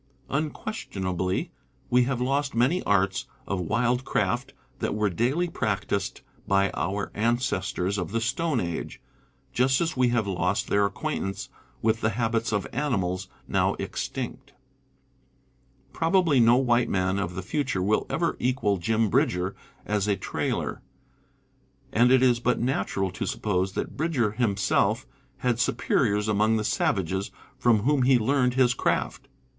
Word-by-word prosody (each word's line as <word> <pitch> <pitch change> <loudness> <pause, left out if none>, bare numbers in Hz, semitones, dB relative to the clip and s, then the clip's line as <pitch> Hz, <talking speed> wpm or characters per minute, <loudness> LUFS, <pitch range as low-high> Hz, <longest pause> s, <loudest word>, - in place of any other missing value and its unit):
Unques 155 +9 -3
tionably 95 -1 -2 0.4
we 125 0 +5
have 130 -1 -1
lost 140 +2 0
many 130 +10 +2
arts 100 -1 +1 0.2
of 100 - -2
wildcraft 125 +3 0 0.3
that - - -1
were 105 -2 +1
daily 130 - +1
practised 100 - -2 0.3
by 100 0 +3
our 100 +3 -2
ancestors 105 -4 0
of 90 -3 -3
the 115 - 0
stone 130 +5 0
age, 85 -4 -4 0.5
just 130 +2 +3
as 165 -2 -1
we 125 -1 +3
have 120 -3 +1
lost 95 +2 -1
their 100 0 +3
acquaintance 95 0 -4 0.3
with 110 0 +2
the 110 - +2
habits 115 -1 0
of 100 -2 0
animals 95 -9 -1 0.2
now - - +1
extinct. - - -5 1.4
Probably 165 -4 +3
no 115 0 +6
white 120 -2 +2
man 95 +1 0
of 90 -3 -3
the 95 - -4
future 125 -4 -1
will 105 +3 +1
ever 170 0 0
equal 120 -5 +1
Jim 110 +5 +1
Bridger 90 -1 +1 0.3
as 105 -1 0
a 100 - +2
trailer; - - -3 1.1
and 120 +3 +4
it 130 0 +5
is 120 -2 +4
but 125 +1 +1
natural 100 -6 -1
to 90 - -4
suppose 95 -2 -1
that - - -4
Bridger 140 -9 +1
himself 105 -3 +1 0.3
had 120 -2 0
superiors 105 -2 +1
among 110 +1 +2
the 110 - -1
savages 95 -2 0 0.3
from 115 -4 +4
whom 145 +1 +2
he 130 0 +5
learned 125 +1 +1
his 125 -2 +4
craft. - - -1
115 Hz, 140 wpm, -26 LUFS, 100-125 Hz, 1.4 s, no